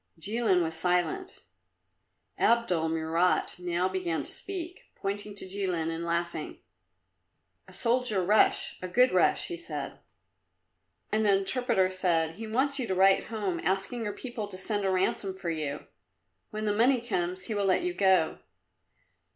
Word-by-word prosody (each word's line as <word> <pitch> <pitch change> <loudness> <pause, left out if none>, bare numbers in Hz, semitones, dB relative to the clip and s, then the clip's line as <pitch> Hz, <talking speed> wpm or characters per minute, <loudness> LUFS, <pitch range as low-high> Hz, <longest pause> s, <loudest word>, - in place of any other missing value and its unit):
Jilin 200 0 +1
was 160 0 -3
silent. 180 - -1 1.0
Abdul 185 -9 +2
Murat 165 +3 0
now 180 0 0
began 185 -3 -2
to - - -3
speak, 360 -2 -6
pointing 205 +1 -4
at - - -14
Jilin 185 -4 -1
and 165 +1 -4
laughing. 170 -1 -3 1.1
"A - - -15
soldier 235 -5 +1
Russ, 210 +3 +3
a 185 - -4
good 250 +7 +4
Russ," 180 -2 +3
he 345 - -5
said. 340 - -6 1.1
And 220 +1 +2
the 200 -2 +5
interpreter 195 -2 +2
said, 170 -3 0
"He 225 0 -6
wants 270 +5 0
you 245 - -2
to 190 - -1
write 190 +1 +4
home 200 -6 -3
asking 195 +6 -1
your 205 -2 -3
people 230 -2 -6
to 185 - -9
send 205 +1 -1
a - - +2
ransom 190 +1 0
for 180 -3 -3
you. 150 -2 -4 0.6
When 215 0 -4
the 210 - +1
money 245 +4 +4
comes, 185 -5 -2
he 220 - -4
will 205 -1 0
let 190 - +2
you 360 0 -1
go." 190 - +2
195 Hz, 155 wpm, -29 LUFS, 175-225 Hz, 1.1 s, the